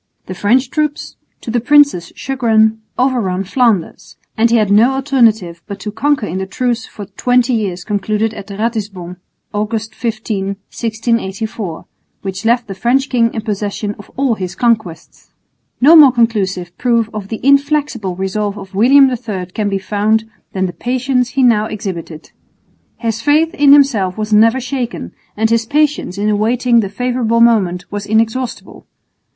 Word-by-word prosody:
The 185 - -6
French 240 +7 +1
troops, 300 -1 -2 0.3
to 230 - -5
the 240 - +1
prince's 280 - +3
chagrin, 225 -4 +1 0.2
overran 230 -8 0
Flanders; 215 -3 -1 0.2
and 230 +1 +3
he 235 - +3
had 210 -3 +1
no 230 +6 +5
alternative 230 -11 +1
but 200 -2 -7
to 210 - -5
concur 285 +1 0
in 185 0 -4
the 190 - -4
truce 240 +3 -2
for 205 - -9
twenty 245 +5 +1
years 190 -6 -2
concluded 210 +2 -1
at 200 - -9
Ratisbon, 200 -4 -4 0.4
August 215 +1 -3
15, 215 -4 -3 0.3
1684, 220 -5 -3 0.4
which 195 +1 -5
left 240 +1 +2
the 195 - -7
French 255 +7 0
king 230 -2 +2
in 220 - -2
possession 205 0 -3
of 205 - -13
all 270 -3 +1
his 185 -4 -5
conquests. 220 -9 -2 0.5
No 295 +6 +7
more 295 -5 +9
conclusive 195 -7 -1
proof 235 -3 +1
of 210 -2 -6
the 220 +1 -5
inflexible 280 - +1
resolve 200 +2 -3
of 195 -1 -10
William 265 +7 +5
III 225 -7 -4
can 210 -2 -1
be 195 - -1
found 210 +3 0 0.3
than 190 -1 -1
the 175 - -4
patience 250 +1 -1
he 265 - +4
now 220 -4 +4
exhibited. 175 -7 -7 0.7
His 225 -1 -3
faith 310 +6 +2
in 290 -6 +4
himself 230 -10 +4
was 215 0 -2
never 225 +4 +4
shaken, 250 -2 -4 0.3
and 220 +1 +1
his 230 0 +1
patience 295 -8 0
in 205 +1 -1
awaiting 235 +3 +2
the 200 -4 -1
favourable 240 +1 -1
moment 200 -7 +2
was 205 0 -5
inexhaustible. 225 +3 -2
220 Hz, 155 wpm, -15 LUFS, 200-250 Hz, 0.7 s, more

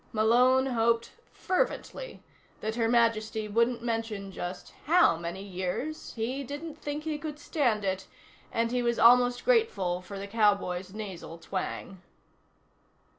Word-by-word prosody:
Malone 250 +4 +4
hoped 230 -2 +1 0.2
fervently - - -2 0.4
that 220 +1 -2
Her 225 -1 +1
Majesty 220 -2 +2
wouldn't 235 +2 +1
mention 225 -4 -3
just 180 0 -6
how 340 - +5
many 170 +3 -5
years. 195 +11 -4
He 250 +5 -2
didn't 295 +3 -7
think 295 +1 -4
he 310 -1 -3
could 300 -1 -5
stand 245 -9 0
it, 190 0 -2 0.4
and 230 0 0
he 250 0 +1
was 235 -1 +1
almost 245 +1 +5
grateful 200 - +2
for 190 +2 -8
the 195 - -5
cowboy's 200 -4 +1
nasal 190 -6 -7
twang. 185 +1 -5
230 Hz, 130 wpm, -29 LUFS, 195-255 Hz, 0.4 s, how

